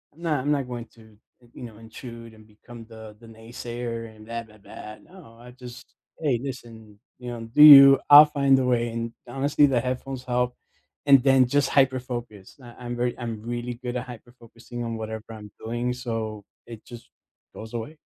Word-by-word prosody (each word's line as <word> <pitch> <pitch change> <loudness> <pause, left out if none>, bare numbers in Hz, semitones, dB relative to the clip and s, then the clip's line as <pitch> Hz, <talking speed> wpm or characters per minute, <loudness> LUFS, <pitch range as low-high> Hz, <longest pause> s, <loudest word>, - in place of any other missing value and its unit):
Nah, 165 -4 -2
I'm 145 +3 -2
not 140 -3 -1
going 120 -2 -7
to 110 -2 -20 0.2
in 120 - -23
you - - -10
know, 110 -3 -10
intrude 115 0 -11
and 110 0 -19
become 115 +2 -14
the 110 -2 -13
the 115 - -16
naysayer 115 0 -8
and, 110 - -15
blah, 115 0 -5
blah, 110 -1 -20
blah, 105 +1 -11
no, 165 -10 -17
I 125 0 -13
just 125 -1 -12 0.4
"Hey 135 -7 0
listen, 115 -6 -10 0.2
you 125 -1 -8
know, 120 - -7
do 150 - +7
you, 140 -2 +10
I'll 145 +1 +10
find 140 -2 +3
a - - 0
way," 120 -1 0
and 115 0 -5 0.2
honestly 140 +3 +1
the 130 -4 +1
headphones 130 +1 -5
help, 125 -1 -2 0.5
and 135 -3 +6
then 135 -2 +4
just 140 +1 +1
hyperfocus. 125 -5 -2
I 120 -1 -14
I'm 120 0 -4
very 120 0 -2
I'm 115 -3 -6
really 120 +1 -5
good 125 0 -4
at 125 +1 -6
hyperfocusing 120 0 -11
on 115 -1 -4
whatever 110 0 -7
I'm 105 -2 -11
doing 120 +2 -3
so 110 -4 -5 0.2
it 115 -2 -12
just 120 -2 -13 0.4
goes 110 +1 -11
away. 115 +4 -5
120 Hz, 190 wpm, -24 LUFS, 115-130 Hz, 0.5 s, you